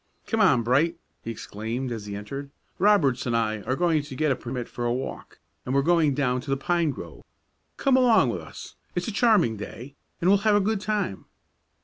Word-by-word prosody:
"Come 225 - -1
on, 125 - +4
Bright!" 145 +8 +2 0.3
he - - -6
exclaimed, 115 +3 -4
as 110 -3 -5
he 100 - -5
entered. 135 +8 -6 0.3
"Roberts 175 -12 +3
and 120 -1 +1
I 110 -2 -1
are 130 - +1
going 165 -1 +2
to 145 -2 -9
get 155 +1 +1
a - - +2
permit 125 -1 -5
for 120 - -6
a 120 - +1
walk, 130 +2 -5 0.3
and 130 - -2
we're 140 - +3
going 160 -3 +3
down 125 -3 0
to 135 - -10
the 135 - +1
pine 170 +3 +1
grove. 140 - -7 0.6
Come 275 -2 +3
along 245 -4 +5
with - - -4
us; - - -10 0.2
it's 175 0 -2
a - - -2
charming 200 - +3
day, 120 +6 -8 0.3
and 170 - 0
we'll 200 +1 +5
have 215 0 +3
a - - +5
good 205 0 0
time." 205 - -2
140 Hz, 215 wpm, -25 LUFS, 120-180 Hz, 0.6 s, along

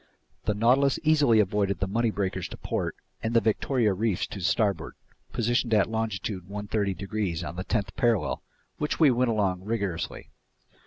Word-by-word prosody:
The 105 - +1
Nautilus 130 +5 +3
easily 150 -8 +5
avoided 100 -1 +1
the 95 - +1
Money 115 +4 +1
breakers 100 -3 -2
to - - -9
port - - -2 0.3
and 115 +1 -2
the - - +8
Victoria 115 0 +1
reefs 105 -1 0
to 100 - -8
starboard, 100 +2 0 0.4
positioned 120 -1 +1
at 105 +1 +3
longitude 105 -4 -2
130 100 -1 -1
degrees 100 -4 -2
on 85 +1 -5
the 95 - -3
tenth 100 0 -2
parallel, 120 -5 +1 0.4
which 150 - -1
we 155 -5 +6
went 125 0 +2
along 100 -5 +1
rigorously. 100 -5 -3
105 Hz, 160 wpm, -27 LUFS, 100-115 Hz, 0.4 s, the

